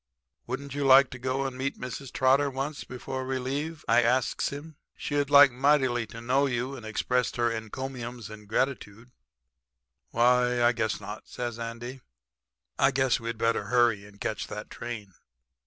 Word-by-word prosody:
"'Wouldn't 135 Hz, +2 st, -5 dB
you 145 Hz, 0 st, -2 dB
like 135 Hz, 0 st, +7 dB
to 125 Hz, -, -8 dB
go 130 Hz, +1 st, -1 dB
down -, -, -3 dB
and 130 Hz, -, -11 dB
meet 135 Hz, +1 st, -2 dB
Mrs. 125 Hz, +1 st, -6 dB
Trotter 135 Hz, +2 st, +3 dB
once 135 Hz, +3 st, -4 dB
before 130 Hz, +1 st, -5 dB
we 130 Hz, 0 st, -2 dB
leave?' 145 Hz, +5 st, -4 dB
I -, -, +5 dB
asks 125 Hz, +2 st, +1 dB
him. 145 Hz, +2 st, -9 dB, 0.2 s
'She'd 145 Hz, -1 st, -1 dB
like 140 Hz, -1 st, +8 dB
mightily 130 Hz, -3 st, +2 dB
to 115 Hz, +1 st, -9 dB
know 130 Hz, +4 st, +2 dB
you 125 Hz, +1 st, -2 dB
and 125 Hz, -, -10 dB
express 125 Hz, +3 st, 0 dB
her 120 Hz, -1 st, +1 dB
encomiums 120 Hz, 0 st, -6 dB
and 105 Hz, -1 st, -11 dB
gratitude.' 115 Hz, -1 st, -2 dB, 1.0 s
"'Why, 125 Hz, +1 st, +3 dB
I 120 Hz, -, +6 dB
guess 110 Hz, -3 st, -1 dB
not,' 105 Hz, +1 st, -8 dB
says 120 Hz, -1 st, -5 dB
Andy. 120 Hz, +3 st, -6 dB, 0.8 s
'I 135 Hz, -, +5 dB
guess 130 Hz, -2 st, +2 dB
we'd 115 Hz, 0 st, -4 dB
better 115 Hz, -2 st, +1 dB
hurry 115 Hz, -2 st, +2 dB
and 100 Hz, 0 st, -18 dB
catch 110 Hz, -, -3 dB
that 105 Hz, -, -7 dB
train.' 110 Hz, -5 st, -7 dB
125 Hz, 170 wpm, -28 LUFS, 115-135 Hz, 1.0 s, like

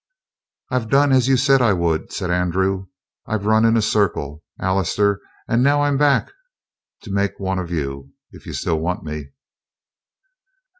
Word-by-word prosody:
"I've 125 Hz, -3 st, -1 dB
done 140 Hz, +2 st, +4 dB
as 130 Hz, -2 st, +4 dB
you 135 Hz, -1 st, +4 dB
said 135 Hz, 0 st, +4 dB
I 115 Hz, -4 st, +4 dB
would," 85 Hz, -3 st, -1 dB
said 90 Hz, -, -3 dB
Andrew. 95 Hz, +2 st, 0 dB, 0.4 s
"I've 110 Hz, -2 st, -2 dB
run 110 Hz, +1 st, +4 dB
in 115 Hz, 0 st, +4 dB
a 110 Hz, -, +2 dB
circle, 80 Hz, -8 st, -1 dB, 0.2 s
Allister, 100 Hz, +2 st, +1 dB, 0.3 s
and 115 Hz, -, +2 dB
now 145 Hz, +2 st, +3 dB
I'm 145 Hz, -1 st, +1 dB
back 145 Hz, -, +2 dB, 0.7 s
to 105 Hz, -, -8 dB
make 100 Hz, 0 st, -1 dB
one 95 Hz, -1 st, -2 dB
of 90 Hz, -2 st, -5 dB
you, 70 Hz, -4 st, -4 dB, 0.2 s
if -, -, -15 dB
you -, -, -6 dB
still 80 Hz, -3 st, -1 dB
want 90 Hz, +3 st, -2 dB
me." 75 Hz, -2 st, -6 dB
100 Hz, 160 wpm, -20 LUFS, 85-120 Hz, 0.7 s, done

